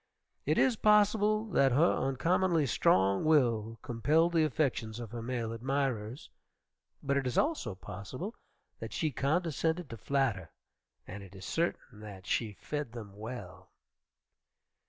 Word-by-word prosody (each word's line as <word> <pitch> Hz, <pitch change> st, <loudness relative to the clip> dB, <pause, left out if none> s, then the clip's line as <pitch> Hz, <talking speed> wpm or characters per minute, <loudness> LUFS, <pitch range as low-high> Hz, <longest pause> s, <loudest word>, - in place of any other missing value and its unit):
It -, -, +2 dB
is 250 Hz, -4 st, +3 dB
possible 210 Hz, 0 st, +4 dB
that 135 Hz, -2 st, +4 dB
her 160 Hz, +7 st, +4 dB
uncommonly 165 Hz, +5 st, +1 dB
strong 95 Hz, -5 st, +3 dB
will 115 Hz, -8 st, +2 dB
compelled 155 Hz, +9 st, +2 dB
the 165 Hz, -2 st, +4 dB
affections 125 Hz, -7 st, -1 dB
of 115 Hz, -3 st, -7 dB
her 120 Hz, -1 st, -5 dB
male 115 Hz, -1 st, -3 dB
admirers, 125 Hz, -1 st, -2 dB, 0.8 s
but 140 Hz, 0 st, +1 dB
it 135 Hz, -2 st, 0 dB
is 125 Hz, -, -2 dB
also 295 Hz, -, 0 dB
possible 105 Hz, -, -7 dB, 0.5 s
that -, -, -7 dB
she 155 Hz, -2 st, 0 dB
condescended 160 Hz, +2 st, 0 dB
to 115 Hz, -, -6 dB
flatter, 120 Hz, -10 st, 0 dB, 0.6 s
and 100 Hz, +2 st, -8 dB
it 100 Hz, 0 st, -13 dB
is 95 Hz, -, -9 dB
certain 165 Hz, -9 st, -2 dB
that 100 Hz, -3 st, -10 dB
she 110 Hz, -1 st, -1 dB
fed 145 Hz, +2 st, -5 dB
them 105 Hz, -5 st, -9 dB
well. 115 Hz, +4 st, -8 dB
130 Hz, 135 wpm, -31 LUFS, 110-160 Hz, 0.8 s, possible